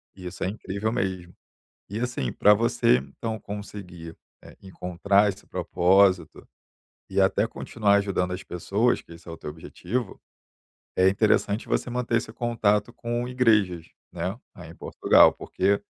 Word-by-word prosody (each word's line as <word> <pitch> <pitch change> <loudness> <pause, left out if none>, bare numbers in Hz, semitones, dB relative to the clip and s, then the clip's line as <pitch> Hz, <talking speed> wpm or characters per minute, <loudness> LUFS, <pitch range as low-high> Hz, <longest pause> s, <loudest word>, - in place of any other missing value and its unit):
E 95 - -11
isso 90 - -6
é - - 0
incrível 100 +1 -3
mesmo. 95 -5 -3 0.6
E 105 +3 -4
assim, 120 - -2
pra 105 - +5
você 110 - +3
então 90 - -5
conseguir, 95 -5 -8 0.3
eh, - - -14
encontrar 95 +2 +1
esse 95 - -7
propósito 95 +1 +2 0.6
e - - 0
até 95 +2 +2
continuar 105 -3 0
ajudando 100 -3 0
as 90 - -6
pessoas, 100 +7 0
que 85 - -14
esse 85 +1 -16
é 85 - -6
o 80 - -8
teu - - -7
objetivo, 105 +8 -5 0.8
é 95 0 +5
interessante 105 +1 +1
você - - -1
manter 120 -1 -1
esse 110 -1 -2
contato 115 -2 0
com 120 0 -3
igrejas, 105 -9 +2 0.3
né, - - -4 0.2
aí - - -11
em - - -12
Portugal. - - +4
Porque 100 +2 0
100 Hz, 150 wpm, -25 LUFS, 90-110 Hz, 0.8 s, pra